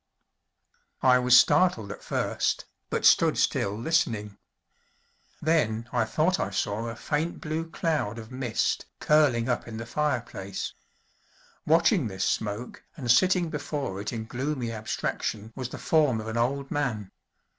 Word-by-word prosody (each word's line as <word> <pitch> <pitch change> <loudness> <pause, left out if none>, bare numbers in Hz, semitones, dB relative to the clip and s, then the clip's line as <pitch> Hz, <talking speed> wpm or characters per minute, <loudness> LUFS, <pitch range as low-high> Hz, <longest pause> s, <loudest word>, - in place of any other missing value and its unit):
I 125 -1 +6
was 125 0 +6
startled 145 - +4
at - - -8
first, - - -1 0.2
but - - -1
stood - - +5
still 100 +1 +1
listening; 115 -7 0 1.0
then 120 -8 +1
I 120 -2 +2
thought 160 +10 +1
I - - -1
saw 100 +3 -2
a 115 - -5
faint 155 +7 -2
blue 160 +1 -3
cloud 155 -11 -1
of 115 0 -9
mist 125 -3 -1
curling 140 -6 +3
up 125 -1 -1
in 110 -1 -6
the 115 - -5
fireplace. 120 -8 -3 0.9
Watching 165 - +4
this 95 -2 -2
smoke 110 +3 -3
and 125 -6 +1
sitting 180 +3 +3
before 145 -9 -3
it 105 - -4
in 110 -2 -4
gloomy 125 0 -3
abstraction 110 0 -3
was 130 -2 -4
the - - -7
form 150 -8 +2
of 110 - -6
an 110 +1 -3
old 135 +4 -1
man. 115 -9 -2
125 Hz, 145 wpm, -27 LUFS, 110-150 Hz, 1.0 s, I